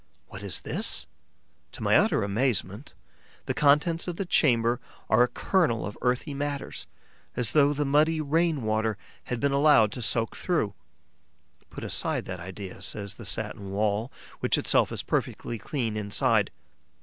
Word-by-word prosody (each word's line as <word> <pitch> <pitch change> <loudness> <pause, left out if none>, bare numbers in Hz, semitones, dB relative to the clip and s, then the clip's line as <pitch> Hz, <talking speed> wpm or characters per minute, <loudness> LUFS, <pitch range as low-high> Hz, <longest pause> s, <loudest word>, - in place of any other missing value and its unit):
What 95 - -9
is 100 -4 -1
this? - - -1 0.7
To - - -7
my - - +3
utter - - +3
astonishment, 105 +1 -2 0.5
the - - -1
contents 150 +4 +3
of 175 - -3
the 195 - -3
chamber 120 -7 +3 0.3
are 110 +2 +5
a 125 - +5
kernel 160 - 0
of 105 - -6
earthy 125 +4 0
matters, 140 0 -4 0.5
as 120 -3 +1
though 145 -1 +4
the 145 0 -1
muddy 155 +3 +3
rain 155 -1 +1
water 110 -1 0 0.3
had 125 - -3
been 140 +2 +1
allowed 140 -7 +5
to 125 - -6
soak 115 0 +1
through. 155 - -1 1.0
Put - - -8
aside - - -1
that 95 -1 -6
idea, 95 +2 -8
says 100 -1 -4
the 115 - -9
satin 100 0 -2
wall, 105 +4 -1 0.3
which - - +2
itself - - +3
is - - -4
perfectly 115 - -2
clean 115 -6 -3
inside. 105 +1 +2
120 Hz, 155 wpm, -27 LUFS, 105-145 Hz, 1.0 s, are